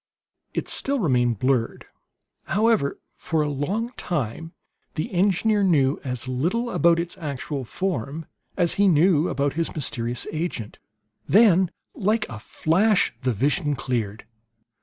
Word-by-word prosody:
It - - -2
still 280 +1 0
remained 125 - +2
blurred, 130 0 0 0.6
however; 210 -5 +1 0.2
for 160 -2 -1
a 150 - -1
long 195 - -2
time 165 +1 -3 0.4
the 180 +8 -3
engineer 200 +3 +2
knew 150 -7 +3
as 125 -2 -3
little 175 - -1
about 170 0 +3
its 170 0 -3
actual 140 -2 -4
form 160 0 -3 0.3
as 175 -3 +2
he 205 - +5
knew 170 -1 +4
about 140 0 0
his 165 +2 -2
mysterious 120 -5 -2
agent. 155 -10 -4 0.5
Then, 190 -4 +5 0.2
like 215 +2 0
a 110 - -7
flash, 185 - +2
the 130 -1 +1
vision 145 - +1
cleared. 115 -6 -3
160 Hz, 130 wpm, -24 LUFS, 130-190 Hz, 0.6 s, he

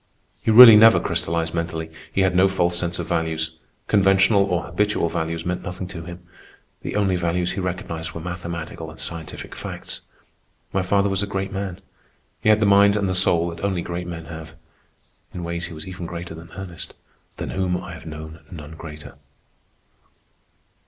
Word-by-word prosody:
He - - -1
really 115 0 +11
never 110 +1 +8
crystallized 85 -2 -1
mentally. 80 -1 -3 0.2
He 95 - +1
had 95 -1 +2
no 95 +2 +6
false 90 -2 +1
sense 85 0 -1
of - - -4
values. 80 -1 -1 0.3
Conventional 95 0 +4
or 90 -3 -1
habitual 90 0 0
values 80 0 -3
meant 90 0 -2
nothing 90 +1 -5
to 85 - -7
him. 85 0 -10 0.6
The - - -5
only 95 -3 +2
values 90 +1 0
he - - -4
recognized 85 -3 -4
were - - -6
mathematical 85 -2 -6
and 80 - -13
scientific 85 -2 -6
facts. - - -7 0.7
My 95 - +2
father 100 +2 +2
was 95 0 0
a 100 - -1
great 95 -1 -3
man. 95 -2 -4 0.6
He - - +2
had 110 0 +6
the 110 - +3
mind 100 0 +6
and 100 -2 0
the 95 - 0
soul 85 -2 +3
that 85 +2 -9
only 95 -4 0
great 85 0 -4
men 85 -2 -6
have. 80 0 -9 0.8
In 90 - -4
ways 85 0 -3
he - - -9
was 75 - -7
even 90 -2 -6
greater 85 0 -6
than 80 +1 -11
Ernest, 90 -3 -7 0.4
than - - -5
whom 90 -1 0
I 90 -1 -8
have 80 - -10
known 80 +1 -8
none 80 -4 -9
greater. 80 -2 -10
85 Hz, 180 wpm, -23 LUFS, 85-95 Hz, 0.8 s, really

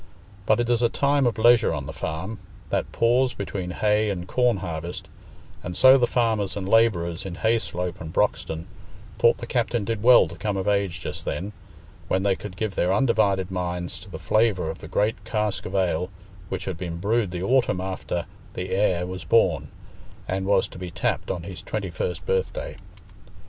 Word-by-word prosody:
But 110 - +4
it 120 - +1
is 120 -1 +2
a 120 - +4
time 140 0 +2
of 120 - -1
leisure 120 0 +5
on 70 -2 -4
the 80 - -6
farm—that 90 +5 -5
pause 125 +2 +2
between 95 -2 -4
hay 105 +3 +1
and 90 -3 -4
corn 125 -2 +2
harvest, 85 -1 -5 0.6
and 90 0 -5
so 130 0 +8
the 120 - +3
farmers 110 -5 0
and 95 -2 -4
labourers 95 -7 +2
in 95 -3 -6
Hayslope 90 -5 -1
and 80 0 -6
Broxton 80 0 0 0.5
thought - - +5
the - - -6
captain 115 -4 0
did 115 -1 -2
well 120 -5 +7
to 85 - -9
come 105 +2 -2
of 95 - -2
age 100 -5 0
just - - -4
then, 100 +4 -4 0.5
when 95 - +1
they 100 -1 +2
could 95 -2 -9
give 110 -3 -2
their 90 0 +1
undivided 100 -5 +2
minds 90 -1 -3
to - - -13
the - - -7
flavour 105 -7 +1
of - - -10
the - - -9
great 105 +3 0
cask 105 -3 -1
of 95 - -6
ale 90 -2 +1 0.4
which 95 - -4
had 95 -4 -4
been 85 -2 -4
brewed 105 +3 +1
the 90 0 -4
autumn 125 -5 +2
after 90 -2 -3 0.3
"the 90 +1 -4
heir" 95 -3 +2
was 90 -1 -6
born, - - +3 0.6
and 95 +1 -2
was 100 -1 +3
to - - -11
be 90 -1 -5
tapped 85 - -2
on - - -3
his - - -7
twenty - - -4
first - - -3
birthday. 475 +1 -1
95 Hz, 190 wpm, -25 LUFS, 90-115 Hz, 0.6 s, so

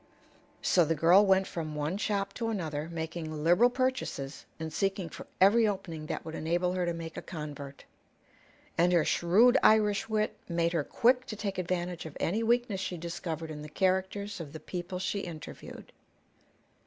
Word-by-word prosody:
So 180 - +4
the 165 +1 +1
girl 170 +6 +6
went 190 -1 +4
from 155 -4 -5
one 150 +4 -1
shop 200 -2 -1
to 230 -2 -2
another, 160 -7 -3
making 160 -2 -4
liberal 175 +9 +5
purchases 250 - -2
and 160 -1 -5
seeking 195 -2 -1
for - - -10
every 215 +4 +6
opening 170 -6 -4
that - - -4
would 160 - -6
enable 175 +3 0
her 180 -1 -1
to - - +1
make 165 -1 -7
a - - -3
convert. 145 -4 -8 0.9
And 175 +1 +4
her 170 -3 +4
shrewd 230 +10 +4
Irish 215 -1 +4
wit 215 0 0
made 170 0 +1
her 160 -3 +1
quick 250 - +2
to 215 - -5
take 200 -2 -3
advantage 175 -1 -2
of 150 - -10
any 210 +7 0
weakness 235 -3 +1
she 180 - -3
discovered 165 -1 -5
in 150 -1 -7
the 150 - -8
characters 190 +3 0
of 150 -4 -7
the 160 - -6
people 180 +3 -5
she 190 +2 -2
interviewed. 165 -5 -9
180 Hz, 175 wpm, -30 LUFS, 160-200 Hz, 0.9 s, girl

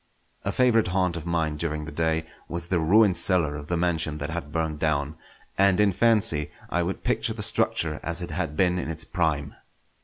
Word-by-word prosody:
A - - -1
favourite 120 -5 +3
haunt 90 -1 0
of 85 0 -6
mine 80 -3 0
during 75 -1 -3
the 80 - -7
day 80 +1 0 0.2
was 85 0 -3
the 85 0 0
ruined 95 +4 +4
cellar 85 -5 +2
of 75 0 -7
the 85 - -1
mansion 85 -3 -1
that 75 +1 -4
had 80 -3 -5
burned 80 -2 -2
down, 75 -1 0 0.4
and 100 -1 +4
in 105 -1 +4
fancy 105 -9 +3 0.2
I 85 - +1
would 90 +3 -3
picture - - 0
the - - -4
structure 75 -2 +1
as 85 +1 -2
it 85 -1 -5
had 80 -2 -3
been 90 -1 +2
in 80 - -4
its 80 0 -3
prime. 80 -5 -1
85 Hz, 205 wpm, -25 LUFS, 75-90 Hz, 0.4 s, ruined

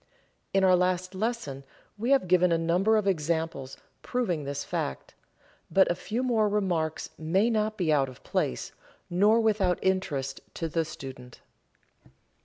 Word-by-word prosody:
In 195 0 +2
our 185 -1 +6
last 180 +1 0
lesson 215 - -3 0.3
we 225 +4 -3
have 275 -9 +4
given 180 0 +4
a 165 - +3
number 180 +7 +2
of 210 - 0
examples 160 -6 -1 0.2
proving 180 - -1
this 140 0 -3
fact, 65 - -4 0.6
but 190 +3 +4
a - - 0
few 225 +8 -3
more 225 -4 +2
remarks 175 -6 -1
may 190 +9 +2
not 215 -1 0
be 165 -5 +2
out 135 -2 +2
of 130 - -14
place, 60 - -2 0.4
nor 205 +6 +4
without 205 -5 +2
interest 160 -8 -1
to 165 - -2
the 165 +1 -1
student. 130 -5 -10
180 Hz, 150 wpm, -28 LUFS, 155-210 Hz, 0.6 s, our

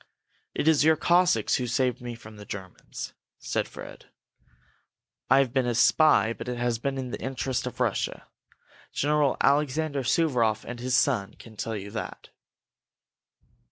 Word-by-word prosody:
"It - - -1
is 155 -3 +5
your 160 +1 +5
Cossacks 175 +3 +3
who 125 - -2
saved 125 +1 0
me 120 -1 -6
from 110 -2 -13
the 105 - -10
Germans," 95 -2 -8 0.2
said - - -2
Fred. - - -11 1.2
"I 130 - +6
have 135 -3 +2
been 130 -2 +1
a 120 - 0
spy 115 -1 +4
but 115 - -9
it 125 -1 -3
has 120 -1 -1
been 135 +2 -2
in 130 -2 -4
the - - -5
interest 130 -1 -2
of 125 - -7
Russia. 120 -5 -1 0.6
General 145 -1 +1
Alexander 145 +1 +1
Suvaroff 120 -6 +1
and 120 0 -7
his 125 +1 +1
son 110 -9 +1
can 110 -2 -14
tell 110 +1 -3
you 100 0 -6
that." 110 - -6
125 Hz, 155 wpm, -27 LUFS, 115-140 Hz, 1.2 s, I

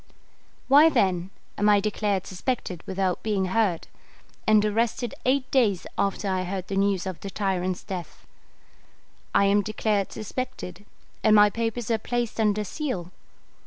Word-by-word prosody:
Why, 290 +4 +7
then, 190 - +1 0.3
am 205 +1 +4
I 205 -1 +6
declared 205 -2 -1
suspected 185 -3 -3
without 190 -1 -1
being 205 -3 0
heard, 205 -7 +1 0.6
and 215 -1 +5
arrested 230 +2 0
eight 260 0 +1
days 215 -9 +2
after 200 +1 -1
I 185 -1 0
heard 185 0 -4
the 195 - -2
news 195 -2 +1
of 185 -3 -5
the 200 - -6
tyrant's 185 -2 -2
death? 185 -4 -7 1.1
I 200 - +5
am 200 +1 +4
declared 210 -1 -1
suspected, 205 -4 -6 0.4
and 215 -1 +6
my 210 0 +6
papers 230 +1 -2
are 225 - +2
placed 240 0 -2
under 210 -1 +2
seal. 200 - -4
205 Hz, 145 wpm, -25 LUFS, 190-225 Hz, 1.1 s, Why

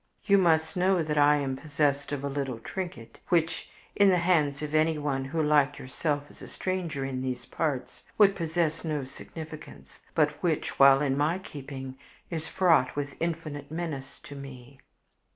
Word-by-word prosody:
"You 200 -1 +5
must 160 -3 +2
know 185 -1 +3
that 150 -1 0
I 145 +1 +6
am 135 -2 -1
possessed 145 -1 0
of 140 -1 -3
a - - -1
little 135 -3 -3
trinket 120 -2 -7
which, 165 -2 +1 0.3
in 200 -1 +6
the 185 - +4
hands 155 -5 +2
of 150 0 -4
anyone 150 -4 +1
who, 155 +4 -1
like 145 -1 +3
yourself, 145 +2 -2
is - - -17
a - - -8
stranger 175 -7 -3
in 130 -1 -3
these 125 -2 -3
parts, 130 -5 -3 0.2
would 200 -2 +6
possess 165 -2 -1
no 155 -4 -2
significance, 135 - -10
but 150 -1 +2
which 165 -4 -1
while 135 0 +8
in 135 -2 +1
my 150 +5 +1
keeping 135 -6 -8 0.3
is 160 -1 -3
fraught 165 -8 +3
with 145 -1 -3
infinite 155 -4 -3
menace 155 -5 -5
to 145 - -10
me." 135 -1 -10
150 Hz, 170 wpm, -28 LUFS, 135-165 Hz, 0.3 s, while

